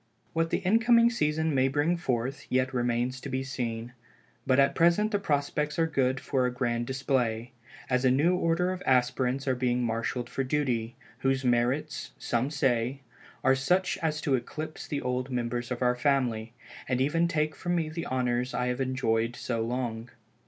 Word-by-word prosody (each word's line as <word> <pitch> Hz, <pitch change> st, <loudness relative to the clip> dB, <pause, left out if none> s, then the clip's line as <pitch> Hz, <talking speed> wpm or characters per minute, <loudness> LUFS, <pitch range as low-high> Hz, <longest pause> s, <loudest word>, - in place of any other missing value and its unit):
What 165 Hz, 0 st, +1 dB
the -, -, +1 dB
incoming 230 Hz, +3 st, +5 dB
season 160 Hz, -6 st, 0 dB
may 130 Hz, -1 st, +3 dB
bring 145 Hz, +5 st, +1 dB
forth, 130 Hz, -4 st, -2 dB
yet 130 Hz, +1 st, +1 dB
remains 120 Hz, +1 st, 0 dB
to -, -, -6 dB
be 130 Hz, 0 st, -2 dB
seen, 120 Hz, -3 st, -4 dB, 0.5 s
but 130 Hz, 0 st, +4 dB
at 140 Hz, 0 st, +4 dB
present 175 Hz, +6 st, +3 dB
the 205 Hz, -, +1 dB
prospects 150 Hz, -3 st, -1 dB
are 165 Hz, -, +3 dB
good 135 Hz, -4 st, +1 dB
for 130 Hz, -2 st, 0 dB
a -, -, -2 dB
grand 120 Hz, -1 st, -1 dB
display, 125 Hz, -3 st, -1 dB, 0.4 s
as 125 Hz, 0 st, +1 dB
a 130 Hz, -, +5 dB
new 150 Hz, +8 st, +3 dB
order 180 Hz, +1 st, +1 dB
of 185 Hz, -1 st, -5 dB
aspirants 130 Hz, +1 st, +1 dB
are 130 Hz, -, +3 dB
being 125 Hz, -1 st, 0 dB
marshaled 115 Hz, +1 st, -2 dB
for 135 Hz, -, -2 dB
duty, 125 Hz, -5 st, -1 dB, 0.2 s
whose 135 Hz, 0 st, 0 dB
merits, 125 Hz, +5 st, 0 dB
some 120 Hz, +3 st, -1 dB
say, 130 Hz, -2 st, 0 dB, 0.4 s
are 130 Hz, -, +5 dB
such 180 Hz, +8 st, +1 dB
as 155 Hz, -2 st, -1 dB
to 140 Hz, -, 0 dB
eclipse 155 Hz, +5 st, -4 dB
the 145 Hz, -, -3 dB
old 125 Hz, +1 st, -2 dB
members 120 Hz, -1 st, -2 dB
of 125 Hz, 0 st, -2 dB
our 125 Hz, 0 st, +4 dB
family, 125 Hz, -4 st, 0 dB, 0.4 s
and 130 Hz, -1 st, +1 dB
even 165 Hz, +6 st, +2 dB
take 155 Hz, -2 st, 0 dB
from 175 Hz, -1 st, -2 dB
me 165 Hz, -2 st, 0 dB
the 160 Hz, +2 st, -5 dB
honors 125 Hz, 0 st, -1 dB
I 125 Hz, 0 st, 0 dB
have 125 Hz, +2 st, -2 dB
enjoyed 120 Hz, -3 st, 0 dB
so 115 Hz, -3 st, -2 dB
long. 120 Hz, -1 st, -3 dB
130 Hz, 180 wpm, -28 LUFS, 125-150 Hz, 0.5 s, incoming